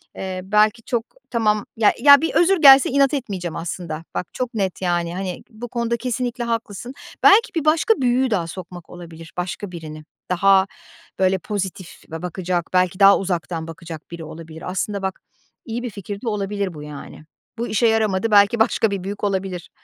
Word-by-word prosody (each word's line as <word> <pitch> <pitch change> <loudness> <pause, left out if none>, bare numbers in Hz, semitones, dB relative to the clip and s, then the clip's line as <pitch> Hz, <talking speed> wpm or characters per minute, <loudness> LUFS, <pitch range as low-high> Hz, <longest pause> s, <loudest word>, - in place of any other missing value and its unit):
eee, 185 -1 -5
belki 210 +3 +2
çok 235 -1 -2 0.2
tamam 215 -3 +1
Ya 220 -2 +4
ya 285 +2 +8
bir 325 - -1
özür 380 +3 +4
gelse 270 -2 +8
inat 275 +1 +3
etmeyeceğim 195 - -3
aslında. 165 -2 -5
Bak, 180 - -2
çok 250 -1 -3
net, 195 -5 -2
yani, 175 -1 -1
hani 185 -2 -5
bu 235 +1 -8
konuda 235 0 -1
kesinlikle 245 0 -3
haklısın. 230 0 -4 0.3
Belki 405 -1 +6
bir 320 -3 -1
başka 315 +8 +4
büyüğü 250 0 +2
daha 175 -6 0
sokmak 175 0 -9
olabilir, 165 -2 -11
başka 180 +2 -4
birini. 155 -3 -8 0.3
Daha 195 +1 +4 0.5
böyle 190 0 +3
pozitif 190 -2 -5
ba 160 0 -5
bakacak, 180 -1 -2
belki 185 0 +2
daha 200 0 +7
uzaktan 170 -3 -3
bakacak 165 -1 -9
biri 170 -1 -7
olabilir. 160 +1 -9
Aslında 200 +2 -2
bak 190 -1 -4 0.4
iyi 240 +1 -4
bir 245 - -3
fikir 200 -1 -7
de 245 - -7
olabilir 200 -3 -2
bu 150 -2 -9
yani. 150 +1 -10 0.3
Bu 235 +1 -2
işe 215 +2 +2
yaramadı, 220 -1 +1
belki 205 +2 +5
başka 220 -1 +2
bir 195 -2 -3
büyük 200 +2 -6
olabilir. 190 -3 -2
195 Hz, 175 wpm, -21 LUFS, 175-230 Hz, 0.5 s, ya